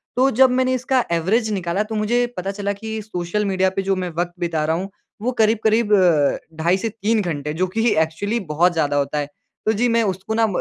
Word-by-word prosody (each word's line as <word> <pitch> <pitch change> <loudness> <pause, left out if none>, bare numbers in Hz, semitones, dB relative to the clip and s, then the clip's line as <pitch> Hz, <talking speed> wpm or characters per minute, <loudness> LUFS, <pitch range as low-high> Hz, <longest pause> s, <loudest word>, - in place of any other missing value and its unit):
तो 260 +2 +4
जब 260 -1 +8
मैंने 255 0 +1
इसका 255 0 +1
एवरेज 215 +7 +1
निकाला 185 +1 -1
तो 220 - -3
मुझे 240 +3 +1
पता 190 +2 -2
चला 200 0 -3
कि 220 +1 -5
सोशल 205 0 -3
मीडिया 190 -1 +2
पे 195 - 0
जो 195 0 0
मैं 180 -1 -3
वक़्त 175 0 -1
बिता 165 -3 -1
रहा 160 +1 +1
हूँ, 190 +3 -4 0.3
वो 250 +3 0
करीब-करीब 220 0 +2
अ, 165 -7 +3 0.3
ढाई 180 +3 +3
से 225 +3 -2
3 215 +1 0
घंटे 150 -4 -3
जो 185 +3 0
कि 225 +1 +3
एक्चुअली 165 +9 0
बहुत 175 +3 +3
ज़्यादा 145 -3 0
होता 140 +1 -1
है। 145 - -2 0.4
तो 220 - +3
जी 240 +3 +1
मैं 230 - +3
उसको 195 +2 -3
ना 225 0 +3
म 200 - -4
200 Hz, 225 wpm, -21 LUFS, 175-220 Hz, 0.4 s, जब